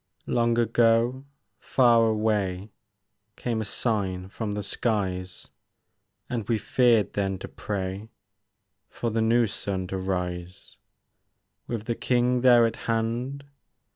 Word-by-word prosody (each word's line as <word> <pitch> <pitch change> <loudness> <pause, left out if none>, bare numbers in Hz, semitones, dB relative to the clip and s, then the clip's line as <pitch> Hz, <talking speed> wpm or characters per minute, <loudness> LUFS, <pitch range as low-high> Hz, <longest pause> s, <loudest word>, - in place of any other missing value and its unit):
Long 120 -1 +1
ago, 120 +3 +2 0.3
far 120 -3 +4
away. 105 -3 0 0.6
Came 115 -2 -2
a - - -3
sign 95 -4 -1
from 105 0 -4
the 105 0 -3
skies; 95 -4 -2 0.8
And 115 -5 -4
we 115 - +3
feared 115 -1 +2
then 95 -1 -1
to - - -8
pray 100 +1 -5 0.8
For 115 - -3
the 115 +1 0
new 115 +1 +3
sun 95 -2 -3
to 95 - -3
rise: 90 -1 -4 0.9
With 115 -3 -3
the 120 - -1
King 125 +1 +1
there 120 -2 +6
at 115 -1 -2
hand. 120 +5 -1
110 Hz, 120 wpm, -26 LUFS, 95-120 Hz, 0.9 s, there